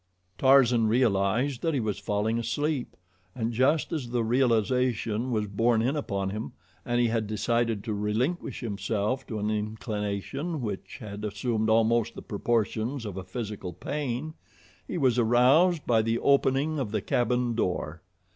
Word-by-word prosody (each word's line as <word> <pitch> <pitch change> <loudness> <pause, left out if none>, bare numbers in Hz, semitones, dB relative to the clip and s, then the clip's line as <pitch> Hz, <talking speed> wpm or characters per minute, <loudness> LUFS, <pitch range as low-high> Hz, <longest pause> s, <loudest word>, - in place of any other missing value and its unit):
Tarzan 125 -4 +5
realized 115 +2 +1
that 165 -2 0
he - - +1
was 105 -4 -2
falling 105 +3 0
asleep, 140 +3 -2 0.4
and 115 -1 -2
just 145 +8 +2
as 135 -7 -3
the 120 -1 0
realization 120 -1 +1
was 110 -3 0
borne 115 +3 +1
in 130 +5 +1
upon 100 -9 -2
him 105 +2 -5 0.3
and 120 0 0
he 120 -1 +3
had 110 -2 -1
decided 115 0 0
to 110 - -3
relinquish 110 +11 -1
himself 110 +2 -2
to 110 - -4
an 105 +1 -1
inclination 110 - -3
which 105 -6 -5
had 105 -1 -7
assumed 110 +1 -1
almost 115 +1 +2
the - - -8
proportions 115 +3 -1
of 100 -3 -5
a 95 - -5
physical 100 -2 -5
pain, 145 - -3 0.5
he - - -3
was 130 -6 +2
aroused 135 +9 +4
by 115 -2 +3
the 115 +1 0
opening 140 +3 +2
of 125 -6 -2
the 105 -1 -1
cabin 125 +3 +1
door. 90 -6 -2
115 Hz, 155 wpm, -27 LUFS, 105-130 Hz, 0.5 s, Tarzan